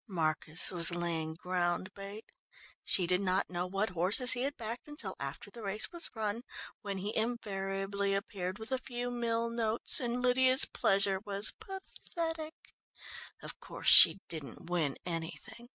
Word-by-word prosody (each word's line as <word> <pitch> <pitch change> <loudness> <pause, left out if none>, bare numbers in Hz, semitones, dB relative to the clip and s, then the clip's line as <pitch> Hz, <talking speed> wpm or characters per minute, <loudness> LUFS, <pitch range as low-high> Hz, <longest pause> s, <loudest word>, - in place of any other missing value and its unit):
"Marcus 160 -2 -1
was 170 -1 +5
laying 165 -2 -4
ground 180 +2 -3
bait. 200 +3 -10 0.6
She 185 - +1
did 180 +2 +1
not 190 -1 -1
know 175 0 -3
what 195 +4 -2
horses 190 +8 +4
he 245 - +2
had 280 +2 -3
backed 230 +4 -7
until 295 -11 -6
after 140 +8 -8
the 235 - -12
race 210 +1 -2
was 345 -1 -2
run, 220 +1 -4 0.4
when 200 -2 -6
he 205 +3 -5
invariably 200 -3 -3
appeared 190 -1 -5
with 220 +3 -6
a 260 - -1
few 245 -1 -6
mille 230 -1 -3
notes 230 -1 +1
and 245 -1 -3
Lydia's 255 +1 +4
pleasure 195 0 +1
was 200 0 0
pathetic. 330 -4 -8 0.7
Of - - -8
course - - -2
she - - +11
didn't 160 +1 -8
win 155 -6 -1
anything. 170 +7 -7
200 Hz, 150 wpm, -30 LUFS, 180-235 Hz, 0.7 s, she